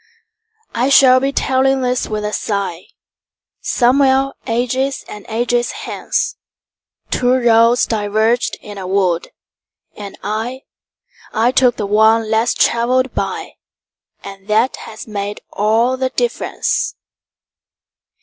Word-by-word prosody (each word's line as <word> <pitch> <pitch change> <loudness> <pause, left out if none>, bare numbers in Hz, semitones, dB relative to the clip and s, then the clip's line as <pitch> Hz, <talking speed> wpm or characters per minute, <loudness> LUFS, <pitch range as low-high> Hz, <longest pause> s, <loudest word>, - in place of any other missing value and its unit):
I 245 +3 +1
shall 260 -2 +6
be 275 +1 -1
telling 265 0 +1
this 250 0 0
with 210 -1 -3
a 210 - -3 1.3
sighSomewhere 270 +2 +2
ages 255 +3 -1
and 210 -1 -10
ages 240 +2 0
hence:Two 250 0 -4
roads 235 -1 +4
diverged 220 +2 0
in 205 -1 -9
a 185 - -6
wood, 185 -3 0 0.7
and 200 -1 -9
I—I 225 +1 -4
took 255 -2 +3
the 210 - -3
one 220 +2 +3
less 225 +2 +2
traveled 250 +2 +1
by, - - -3 0.7
And 195 0 -11
that 220 +4 +2
has 220 -1 -9
made 205 -1 -5
all 225 +5 +1
the 260 0 -1
difference. 480 - -2
235 Hz, 105 wpm, -17 LUFS, 215-255 Hz, 1.3 s, shall